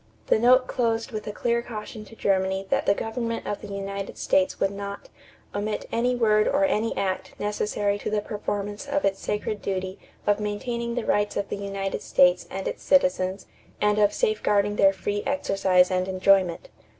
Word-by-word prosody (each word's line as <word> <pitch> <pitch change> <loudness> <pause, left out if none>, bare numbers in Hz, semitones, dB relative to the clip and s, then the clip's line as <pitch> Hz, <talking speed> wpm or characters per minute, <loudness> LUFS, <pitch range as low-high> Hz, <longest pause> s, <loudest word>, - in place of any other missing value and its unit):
The - - +3
note 255 +2 +5
closed 230 -1 -1
with 215 -2 -5
a - - -2
clear 235 +2 0
caution 220 -2 -7
to 225 - -14
Germany 190 -1 0
that - - +1
the 200 - +4
government 230 +1 -3
of 205 - -3
the - - -8
United 200 0 -5
States 185 -1 +1
would 195 - +1
not 200 - -7 0.4
"omit 210 +1 -3
any 245 +2 +1
word 215 -3 +3
or 290 +1 +3
any 230 -5 0
act 190 -1 -3
necessary 205 0 -1
to - - -3
the 215 - +1
performance 205 +3 -4
of 285 +1 0
its 195 0 +1
sacred 210 0 -3
duty 190 -1 -3 0.3
of 205 0 +2
maintaining 235 +3 -3
the 245 - -2
rights 205 0 +1
of 200 - -2
the - - -3
United 195 -1 -3
States 180 0 +3
and 190 0 -4
its - - -4
citizens 205 -9 +2 0.3
and 210 0 +2
of 205 -1 +4
safeguarding 205 - +1
their 195 0 +6
free 205 +1 -3
exercise 195 -9 +2
and 185 0 0
enjoyment." 190 - +2
205 Hz, 180 wpm, -25 LUFS, 195-230 Hz, 0.4 s, their